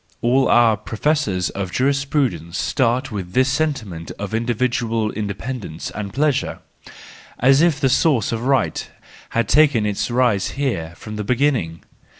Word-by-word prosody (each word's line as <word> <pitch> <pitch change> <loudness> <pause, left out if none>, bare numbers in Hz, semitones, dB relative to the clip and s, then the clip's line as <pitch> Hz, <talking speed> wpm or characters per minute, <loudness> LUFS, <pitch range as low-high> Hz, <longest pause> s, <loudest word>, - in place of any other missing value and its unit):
All 130 +3 +3
our 115 -2 +4
pro¬ 110 +2 -8
fessors 105 - 0
of 95 -2 -4
jurisprudence 135 - 0
start 130 +1 0
with 95 -4 -5
this 130 +1 +3
sentiment 130 - -2
of 105 0 -5
individual 115 -1 0
independence 105 -3 -5
and 100 -2 -5
pleasure, 145 +2 0 0.8
as 135 +3 +4
if 165 -4 +3
the 135 - +2
source 130 - +2
of 115 -1 -2
right 135 +1 0 0.5
had 115 -3 +2
taken 140 -6 +4
its 105 +2 -1
rise 120 -6 +2
here 85 -13 -2
from 105 -1 -8
the 105 - -3
beginning. 120 - 0
120 Hz, 145 wpm, -20 LUFS, 100-135 Hz, 0.8 s, our